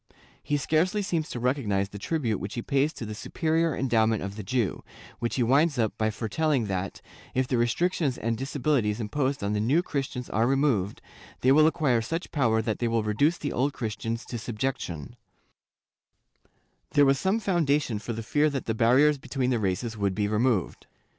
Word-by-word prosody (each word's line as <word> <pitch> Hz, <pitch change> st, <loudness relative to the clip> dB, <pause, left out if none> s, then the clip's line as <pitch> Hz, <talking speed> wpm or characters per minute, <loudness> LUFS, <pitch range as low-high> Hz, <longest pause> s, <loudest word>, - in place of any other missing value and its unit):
He 145 Hz, -, 0 dB
scarcely 170 Hz, +8 st, +1 dB
seems 165 Hz, -5 st, -1 dB
to 120 Hz, -, -5 dB
recognize 115 Hz, -6 st, 0 dB
the 100 Hz, -, -9 dB
tribute 120 Hz, -, -1 dB
which 100 Hz, +2 st, -6 dB
he 120 Hz, -, -3 dB
pays 140 Hz, +2 st, +1 dB
to 120 Hz, -, -6 dB
the 105 Hz, -, -5 dB
superior 160 Hz, -, 0 dB
endowment 115 Hz, -5 st, +1 dB
of 100 Hz, +1 st, -5 dB
the 105 Hz, -, -5 dB
Jew, 115 Hz, 0 st, -1 dB, 0.4 s
when 120 Hz, -, -1 dB
he 125 Hz, -, 0 dB
winds 140 Hz, +5 st, +3 dB
up 110 Hz, -3 st, 0 dB
by 110 Hz, 0 st, +2 dB
foretelling 120 Hz, +5 st, 0 dB
that, 95 Hz, -1 st, -3 dB, 0.3 s
if 130 Hz, 0 st, +1 dB
the 125 Hz, -, 0 dB
restrictions 140 Hz, +3 st, +1 dB
and 115 Hz, 0 st, -1 dB
disabilities 130 Hz, -4 st, 0 dB
imposed 130 Hz, +3 st, -1 dB
on 100 Hz, +1 st, 0 dB
the 105 Hz, -, 0 dB
New 135 Hz, +11 st, +2 dB
Christians 135 Hz, -5 st, -3 dB
are 115 Hz, +2 st, +2 dB
removed, 130 Hz, -8 st, +1 dB, 0.4 s
they 130 Hz, -, +4 dB
will 155 Hz, +3 st, +6 dB
acquire 145 Hz, -8 st, +2 dB
such 165 Hz, +10 st, -4 dB
power 115 Hz, -6 st, +2 dB
that 110 Hz, -1 st, -2 dB
they 120 Hz, -, 0 dB
will 115 Hz, -1 st, +1 dB
reduce 140 Hz, +11 st, +2 dB
the 145 Hz, -, -3 dB
Old 135 Hz, +3 st, 0 dB
Christians 115 Hz, -1 st, -4 dB
to 120 Hz, -, -5 dB
subjection/ 110 Hz, -, -4 dB, 1.8 s
There 145 Hz, -, +6 dB
was 135 Hz, -1 st, +3 dB
some 195 Hz, +4 st, +1 dB
foundation 150 Hz, -, +1 dB
for 115 Hz, +2 st, -5 dB
the 115 Hz, 0 st, -5 dB
fear 150 Hz, +6 st, +2 dB
that 140 Hz, -3 st, -4 dB
the 110 Hz, -, 0 dB
barriers 130 Hz, +6 st, +4 dB
between 130 Hz, -1 st, -2 dB
the 120 Hz, -, +1 dB
races 110 Hz, +4 st, -1 dB
would 100 Hz, -2 st, 0 dB
be 105 Hz, -1 st, 0 dB
removed. 110 Hz, -2 st, 0 dB
125 Hz, 185 wpm, -27 LUFS, 110-145 Hz, 1.8 s, will